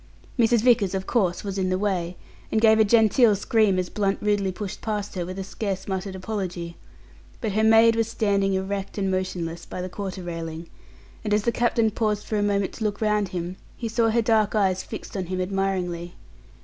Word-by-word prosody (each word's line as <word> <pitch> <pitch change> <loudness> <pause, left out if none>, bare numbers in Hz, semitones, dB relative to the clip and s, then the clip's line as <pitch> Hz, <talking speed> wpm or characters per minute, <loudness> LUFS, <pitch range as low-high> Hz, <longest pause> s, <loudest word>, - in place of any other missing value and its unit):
Mrs. 235 -1 +4
Vickers, 225 -6 +3
of 190 0 -3
course, 190 -7 0
was 200 -1 -3
in 185 -1 0
the 185 - +1
way, 185 -3 -1 0.3
and 220 - +2
gave 220 0 +5
a - - +7
genteel 220 +1 +5
scream 205 -1 +2
as 180 -1 0
Blunt 200 0 0
rudely 205 -2 +1
pushed 205 +1 -6
past 210 -2 -3
her 175 -2 -3
with 185 +1 -6
a 195 - -3
scarce 195 -1 -4
muttered 190 0 -3
apology; 185 -4 -4 0.6
but 220 - -2
her 215 +2 +1
maid 225 +1 +6
was 225 -1 +1
standing 200 -3 +1
erect 195 +1 -3
and 195 -1 0
motionless, 175 -3 -3
by - - -7
the 180 +1 -4
quarter 190 -1 -5
railing, 165 -1 -5 0.6
and 210 -1 +1
as 210 - +1
the 235 - +2
captain 235 -2 +2
paused 210 -1 -1
for 215 - -1
a - - +1
moment 200 -1 0
to 225 - -6
look 205 -1 -1
round 210 -2 +1
him, 180 0 -5 0.2
he 235 - -3
saw 225 0 +2
her 230 +1 +2
dark 220 -2 +2
eyes 190 -3 +2
fixed 220 - -8
on 185 -3 -3
him 185 +1 -3
admiringly. 180 -2 -2
200 Hz, 205 wpm, -25 LUFS, 185-220 Hz, 0.6 s, a